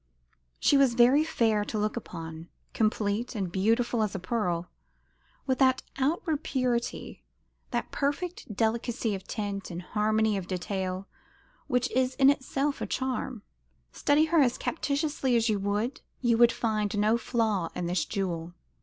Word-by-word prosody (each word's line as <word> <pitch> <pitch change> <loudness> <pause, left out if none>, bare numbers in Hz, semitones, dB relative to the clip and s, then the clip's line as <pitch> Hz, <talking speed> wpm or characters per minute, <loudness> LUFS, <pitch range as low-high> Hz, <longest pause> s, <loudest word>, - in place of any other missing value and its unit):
She 285 - +4
was 270 -4 +4
very 250 +5 +6
fair 225 -9 +1
to 215 - -3
look 210 0 0
upon 165 -6 -7 0.2
complete 215 +2 0
and 190 -5 -2
beautiful 225 +5 +1
as 210 -2 -1
a - - -2
pearl 180 -3 -1 0.8
with 260 -2 0
that 260 -1 +4 0.2
outward 310 +2 0
purity, 250 -4 -2 0.5
that - - -2
perfect 290 - -3
delicacy 225 +1 0
of 190 -1 -6
tint 200 -3 -4
and 175 0 -6
harmony 215 +1 +1
of 185 -2 -5
detail 185 +1 -3 0.6
which 250 0 +1
is 255 0 +1
in 275 0 +6
itself 280 +1 -2
a - - -2
charm. 260 -3 -3 0.5
Study 290 +2 +3
her 325 +1 +3
as 250 -3 +2
captiously 285 -4 -1
as 230 0 +2
you 210 -2 +1
would, 205 +6 -1 0.2
you 240 -2 +3
could 235 0 +6
find 215 -3 -1
no 210 +2 +3
flaw 220 -7 0
in 175 - -2
this 175 -1 0
jewel. 175 -4 -3
225 Hz, 150 wpm, -28 LUFS, 200-260 Hz, 0.8 s, very